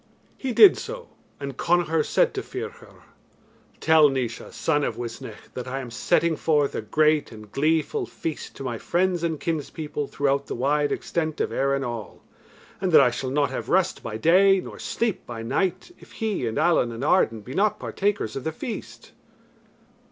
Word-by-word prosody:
He 265 - -3
did 385 - +8
so; 480 +1 -7 0.3
and 140 -2 -5
Connachar 165 -2 +2
said - - +2
to - - -3
Ferchar, 455 +3 -8 0.8
"Tell 155 -2 +6
Naois, 125 -4 -3
son 150 -2 0
of - - -2
Uisnech, 120 -1 -8
that 125 0 -6
I 135 +2 -3
am 125 -3 -7
setting 170 +6 +2
forth 150 -3 +1
a - - -2
great 155 +6 +2
and 105 -2 -12
gleeful 160 - 0
feast 160 -2 -6
to - - -7
my 120 -4 -3
friends 180 0 0
and 165 -3 -1
kinspeople 150 -2 -3
throughout 140 0 0
the - - -4
wide 145 +4 +1
extent 160 -2 -2
of - - 0
Erin 140 0 0
all, 120 -4 -6 0.6
and 190 -2 0
that - - +10
I 125 - +4
shall 130 +2 -3
not 140 0 +1
have 130 - -5
rest 185 0 +2
by 110 -1 -5
day 190 - +5
nor - - -9
sleep 230 -4 -2
by 115 -2 -6
night 185 - -1
if - - -16
he 210 - -2
and 110 - -3
Allen 165 -8 +3
and 115 +3 -6
Arden 115 - +2
be 125 +6 -9
not 200 +4 +2
partakers 200 - -2
of 135 - -4
the 160 - -2
feast." 215 +8 -7
155 Hz, 180 wpm, -25 LUFS, 130-185 Hz, 0.8 s, that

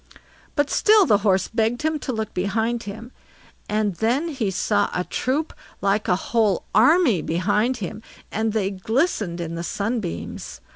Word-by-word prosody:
But 290 -2 +1
still 425 -2 +5
the 210 -9 +4
Horse 190 -3 +2
begged 225 +3 0
him 315 -1 0
to 265 - -3
look 220 -3 -3
behind 220 +5 -1
him, 225 +5 -9 0.6
and 210 -3 0
then 255 +9 +1
he 260 -9 -1
saw 205 +2 +1
a 180 - 0
troop 280 - -2 0.3
like 200 +2 +1
a 180 - +3
whole 210 -1 +1
army 250 - +5
behind 210 +9 0
him, 210 0 -6 0.3
and 220 +1 0
they 205 -3 0
glistened 205 - -1
in 165 -1 -4
the 170 - -4
sunbeams. 200 +1 -4
220 Hz, 155 wpm, -23 LUFS, 195-250 Hz, 0.6 s, still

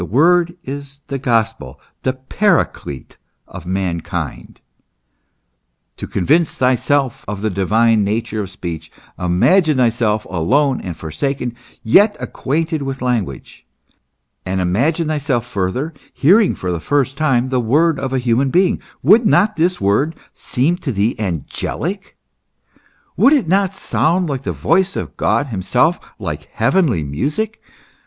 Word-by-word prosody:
The - - -2
word 175 - +3
is 140 -1 -8
the 135 -1 -3
gospel, 115 - -1 0.2
the 130 - 0
paraclete 130 - -1 0.3
of 85 - -10
mankind. 90 -3 -4 1.4
To - - -6
con 95 - -2
vince 160 +3 +3
thyself 130 +1 +1
of 105 0 -5
the 110 - 0
divine 110 +4 +2
nature 110 +1 -2
of 100 - -5
speech, 85 -4 -7 0.3
imagine 150 - +3
thyself 115 -3 +1
alone 130 - +1
and 85 -3 -6
forsaken, 120 - -3 0.3
yet 205 - +4
acquainted 160 +3 -2
with 135 -1 -4
language; 110 - -3 0.8
and 95 0 -2
imagine 135 - +1
thyself 145 -6 -1
further 120 - -2 0.2
hearing 195 +8 +4
for 90 - -3
the 85 - -2
first 140 - 0
time 130 -4 +1
the 130 -1 +1
word 150 +7 +2
of 135 -1 -3
a 135 - 0
human 125 +2 +1
being: 180 +6 +2 0.2
would 225 0 +6
not 215 +1 +3
this 175 +3 +1
word 105 +12 +1 0.2
seem 145 +8 -1
to 155 -7 -4
thee 105 +1 0
angelic, 125 - -4 1.0
would 275 - +5
it 275 - +2
not 195 +2 +1
sound 175 -1 0
like 135 -3 -3
the - - -3
voice 190 +4 +1
of - - -5
God 145 - +1
himself, 125 - +1 0.2
like 75 -8 -6
heavenly 120 - +2
music 150 - -3
130 Hz, 135 wpm, -18 LUFS, 100-160 Hz, 1.4 s, would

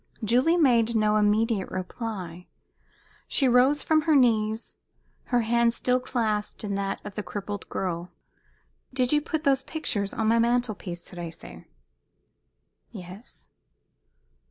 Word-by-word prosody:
Julie 255 +10 +3
made 235 -7 +3
no 215 -1 +3
immediate 210 -1 +1
reply. 185 -2 -6 0.8
She 270 - +2
rose 255 +4 +4
from 315 -1 +3
her 310 0 +2
knees, 225 -4 +2 0.5
her 245 -1 +1
hand 235 +1 +2
still 250 0 +2
clasped 220 -5 -2
in 205 -1 -3
that 195 0 -2
of 205 - -7
the 210 - -4
crippled 205 -1 -6
girl. 175 -1 -3 0.8
"Did 255 0 +1
you 295 - +3
put 315 0 -3
those 270 -2 +3
pictures 220 -9 -2
on 225 - -2
my 230 +1 +4
mantel 240 0 +2
piece, 175 -3 -7
Thérèse?" 170 -2 -9 1.2
"Yes." 195 +1 -11
225 Hz, 130 wpm, -26 LUFS, 200-250 Hz, 1.2 s, rose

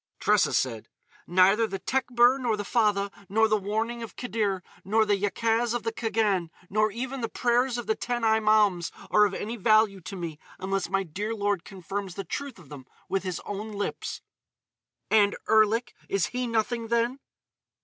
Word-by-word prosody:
Tressa - - +3
said: 115 -4 -1 0.4
"Neither 190 +5 +4
the 195 - -4
Tekbir 250 +3 +2
nor 235 -4 0
the 205 - -4
fatha, 205 -3 +1 0.2
nor 220 +3 +4
the 215 - +2
warning 220 +4 -2
of 230 - -8
Khidr, 210 -6 -2 0.2
nor 220 +3 +2
the 205 -1 +3
Yacaz 225 +4 0
of 240 - -2
the 225 - -1
Khagan, 215 -6 0 0.2
nor 215 +1 +3
even 255 +4 -5
the 230 - -2
prayers 245 +1 +1
of 240 - -4
the 220 - +2
Ten 240 +1 -3
Imaums 215 -5 +3 0.2
are 210 0 +6
of 200 -2 -2
any 225 +3 -4
value 215 -2 +3
to 195 - -7
me 165 -4 -6 0.2
unless 195 0 -2
my 195 0 +1
dear 205 +6 -4
lord 205 -4 0
confirms 195 0 -6
the 195 - -4
truth 280 +4 -5
of 165 -7 -16
them 135 -3 -10 0.2
with 195 +1 0
his 185 -3 -4
own 210 +2 -6
lips." 205 0 -4 0.9
"And 205 -2 +4
Erlik? 220 +2 +3 0.2
Is 195 -2 +1
he 250 0 -1
nothing, 230 0 -1
then?" 235 +3 0
215 Hz, 175 wpm, -27 LUFS, 195-230 Hz, 0.9 s, are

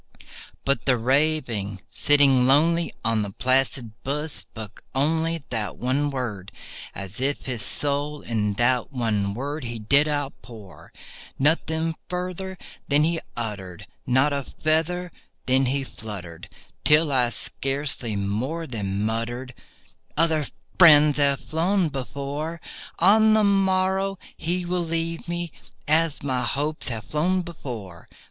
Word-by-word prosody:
But 135 -3 0
the 130 -2 +4
Raven, 125 -6 +1
sitting 140 -3 +4
lonely 165 +5 +3
on 115 -1 +3
that 100 -2 -5
placid 130 -2 +1
bust, 150 +3 -2
spoke 110 -2 -9
only 160 +3 +1
That 110 -3 -2
one 135 +4 0
word, 115 -8 -4 0.4
as 100 +5 -6
if 140 +2 -1
his 125 -4 -3
soul 145 +5 -1
in 105 -3 -1
that 125 +3 +2
one 105 -6 -1
word 145 +4 -4
he 120 0 -4
did 140 +8 +3
outpour. 130 - -5 0.5
Nothing 160 +2 +1 0.2
further 185 +1 -4 0.3
then 145 +1 +3
he 165 +1 +1 0.2
uttered—not 110 +6 -1
a 140 -1 -1
feather 165 +5 -1 0.3
then 130 0 +3
he 135 +2 0
fluttered— 95 -10 -8 0.3
Till 150 0 +4
I 125 -3 +3
scarcely 135 0 -3
more 115 +12 -2
than 100 -6 -3
muttered, 120 +3 -3 0.6
"Other 160 -4 +2 0.3
friends 150 -4 +8
have 140 -1 +3
flown 175 +2 +1
before— 140 +4 -4 0.4
On 215 +4 +5
the 215 - +4
morrow 195 0 +2 0.2
he 175 +2 -2
will 175 0 -1
leave 165 0 -3
me, 175 -1 -3 0.4
as 155 0 +1
my 130 -3 0
hopes 145 +5 +3
have 115 -4 -3
flown 180 +5 0
before." 115 - -8
140 Hz, 125 wpm, -24 LUFS, 120-160 Hz, 0.6 s, friends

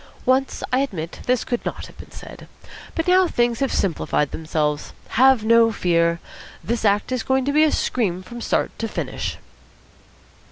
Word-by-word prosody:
Once, 260 +1 +1
I 255 - +4
admit, 180 - -4
this 250 -1 +2
could 240 -2 -3
not - - -5
have - - -15
been - - -11
said. - - -11 0.5
But 325 - -1
now 365 0 +5
things 240 -5 0
have 275 -1 0
simplified 155 -5 0
themselves. 150 -2 -2 0.2
Have 255 -2 +4
no 230 0 +5
fear. 170 -4 +1 0.4
This 230 0 -2
act 205 +3 +2
is 255 -2 0
going 265 +1 0
to 285 - 0
be 305 +1 +5
a 310 - +3
scream 185 -7 -1
from 240 +4 -9
start - - 0
to 225 - -2
finish." - - -4
230 Hz, 170 wpm, -22 LUFS, 180-265 Hz, 0.5 s, now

